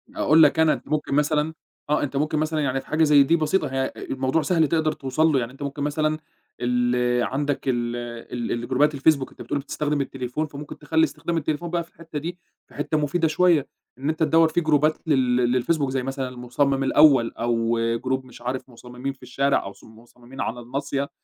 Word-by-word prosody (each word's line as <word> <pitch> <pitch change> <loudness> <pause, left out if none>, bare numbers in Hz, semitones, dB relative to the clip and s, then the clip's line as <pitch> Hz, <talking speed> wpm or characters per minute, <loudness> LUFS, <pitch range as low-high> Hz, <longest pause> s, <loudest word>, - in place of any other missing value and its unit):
أقول 160 +2 +5
لك 150 +2 +4
أنا، 160 -1 +5
أنت - - -8
ممكن 150 -1 -1
مثلًا 150 +1 +1 0.4
آه، 150 - +2
أنت 140 -1 -4
ممكن 155 +2 0
مثلًا 155 0 -1
يعني 135 -2 0
في - - -23
حاجة 160 +1 +2
زي 145 -2 +6
دي 165 +5 +3
بسيطة، 160 +1 +1
هي، 135 0 -2
آآ، 130 - -2 0.2
الموضوع 130 +4 0
سهل 165 -2 +2
تقدر 160 0 +1
توصل 135 +4 0
له، 140 - +3
يعني 120 -1 -4
أنت 135 +2 -9
ممكن 140 +1 -4
مثلًا 155 +1 0 0.4
ال 125 0 +1
عندَك 145 +2 -1
ال 120 -2 0 0.6
الجروبات 130 +5 +1
الFacebook، 140 -1 +2
أنت - - -14
بتقول 145 - -2
بتستخدم 145 +1 -2
التليفون، 135 +2 -3
فممكن 145 0 -9
تخلّي 160 +2 +1
استخدام 165 +2 -2
التليفون 155 +2 -2
بقى 170 0 -1
في 165 - -21
الحتّة 160 -2 -7
دي 170 +4 -5 0.3
في - - -19
حتّة 145 +2 -1
مفيدة 155 +3 +1
شوية، 160 -2 +3 0.3
إن 135 +3 -2
أنت 160 - -2
تدوّر 160 +1 +5
في 175 - 0
جروبات 155 -1 +2
لل 125 -3 +2
للFacebook 150 -3 0
زي 130 -1 -1
مثلًا 135 0 -3
المُصمم 130 +2 0
الأول، 135 -4 +5
أو 115 0 0 0.3
Group 130 0 0
مش 125 -2 -14
عارف 130 +2 -4
مصممين 125 +2 -7
في 135 - -21
الشارع، 140 +2 +1
أو - - -6
مص 100 - -16
مصممين 120 +3 -12
على 120 - -3
الناصية، 140 +3 -3
140 Hz, 200 wpm, -24 LUFS, 130-155 Hz, 0.6 s, زي